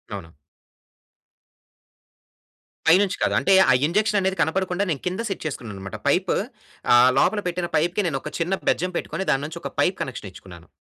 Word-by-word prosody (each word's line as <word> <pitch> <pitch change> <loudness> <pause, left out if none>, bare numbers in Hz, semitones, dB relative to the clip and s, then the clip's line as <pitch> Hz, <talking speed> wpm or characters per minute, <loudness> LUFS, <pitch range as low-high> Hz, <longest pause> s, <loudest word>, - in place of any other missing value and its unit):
అవును. - - -9 2.6
పైనుంచి 185 +4 +4
కాదు - - +1
అంటే 195 - +2 0.2
ఆ - - +6
ఇంజెక్షన్ 210 +3 +1
అనేది 190 0 -1
కనపడకుండా 180 +4 0
నేను 140 - -3
కింద 185 +5 -2
సెట్ 195 - -5
చేసుకున్నాను 120 -8 -5
అన్నమాట. 95 0 -7
పైప్ - - +2 0.6
ఆహ్, 120 +1 +7
లోపల 205 +2 +2
పెట్టిన 175 0 -2
పైప్‌కి 175 +6 0
నేను 135 -5 -2
ఒక - - -7
చిన్న 170 +3 -1 0.2
బెజ్జం 180 +2 0
పెట్టుకొని 190 - -4
దాని 135 +1 0
నుంచి 160 +3 -7
ఒక - - -5
పైప్ 185 - +1
కనెక్షన్ 120 -6 -5
ఇచ్చుకున్నాను. 85 -3 -14
175 Hz, 160 wpm, -23 LUFS, 135-190 Hz, 2.6 s, ఆహ్